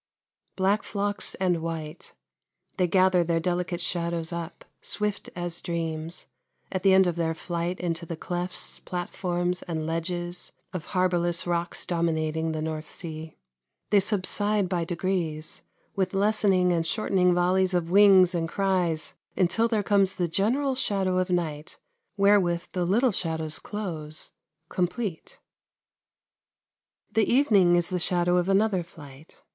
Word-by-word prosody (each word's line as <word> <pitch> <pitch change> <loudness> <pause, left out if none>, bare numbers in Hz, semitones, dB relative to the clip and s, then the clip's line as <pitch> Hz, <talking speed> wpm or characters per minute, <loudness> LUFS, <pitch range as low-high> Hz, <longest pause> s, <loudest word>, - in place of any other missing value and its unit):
Black 195 +3 +2
flocks 205 0 0
and 180 -3 0
white 160 -1 -5 0.6
they 180 -2 +2
gather 185 0 +4
their 165 0 0
delicate 175 +1 -1
shadows 170 -1 -2
up, 170 0 -6 0.2
"swift 210 -1 -2
as 175 -1 -3
dreams," 165 -1 -3 0.5
at 185 - -2
the 195 - +4
end 190 0 +6
of 175 -2 -1
their 165 -1 0
flight 175 +2 -3
into 170 -1 -2
the 165 - -5
clefts, 180 +2 -3
platforms, 180 0 -2
and 160 -3 -4
ledges 175 +2 -3 0.2
of 180 -3 -5
harbourless 175 -2 +2
rocks 175 0 -1
dominating 160 -2 0
the 155 -1 -3
North 155 -1 -4
Sea. 160 -2 -7 0.5
They 205 - +6
subside 205 0 +1
by 175 -2 -1
degrees, 170 -3 -2 0.3
with 190 -1 -1
lessening 195 -3 +3
and 165 -1 0
shortening 180 -2 +2
volleys 185 +1 +2
of 170 -1 -1
wings 190 -2 +7
and 165 -2 -1
cries 180 -5 0 0.2
until 195 +5 +2
there 220 -3 0
comes 195 -2 +2
the 175 - 0
general 245 - +1
shadow 195 -7 0
of 185 0 -1
night 160 -4 -2 0.4
wherewith 195 -4 +3
the 180 -2 -1
little 230 +8 +3
shadows 160 -4 -1
close, 160 -8 -5 0.4
complete. 180 +1 -3 1.7
The 220 -1 +2
evening 205 -10 +5
is 175 -1 +2
the 180 - 0
shadow 175 0 +2
of 180 +1 +1
another 195 -1 +3
flight. 150 -3 -14
175 Hz, 135 wpm, -26 LUFS, 165-190 Hz, 1.7 s, wings